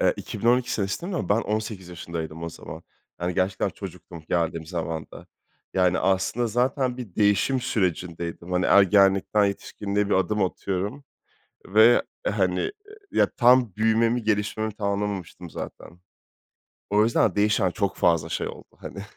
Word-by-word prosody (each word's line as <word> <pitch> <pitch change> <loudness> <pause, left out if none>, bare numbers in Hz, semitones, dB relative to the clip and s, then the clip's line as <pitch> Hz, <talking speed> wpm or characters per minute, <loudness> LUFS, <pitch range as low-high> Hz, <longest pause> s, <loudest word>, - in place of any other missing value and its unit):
Eee, - - +4
2012 120 +1 0
senesinde 100 - -2
no 130 - -2
ben 105 +3 +3
18 105 -4 -3
yaşındaydım 85 -2 -6
o 85 - -3
zaman. - - -10 0.4
Yani 90 0 -1
gerçekten 95 +1 0
çocuktum 85 -2 -9
geldiğim 85 -2 -1
zamanda. 80 -2 -5 0.5
Yani, 90 0 +3
aslında 95 +5 +1
zaten 125 +2 0
bir 115 -8 -8
değişim 105 +6 +2
sürecindeydim. 85 -4 -2
Hani, 90 0 +2
ergenlikten 100 +1 +4
yetişkinliğe 100 0 -2
bir - - +2
adım 100 +2 +1
atıyorum 100 +9 -3 0.6
ve, 110 +4 +6 0.2
hani, 410 -4 0 0.4
ya, - - +3
tam 125 -4 +5
büyümemi, 115 +2 +2
gelişmemi 110 0 -1
tamamlamamıştım 100 -4 -3
zaten. 85 - -9 0.9
O 105 +1 +4
yüzden 110 -4 +2
değişen 105 -3 +2
çok 100 +1 -2
fazla 85 -2 +2
şey 85 - -2
oldu, - - -12
hani. 100 - -8
100 Hz, 130 wpm, -25 LUFS, 90-110 Hz, 0.9 s, ve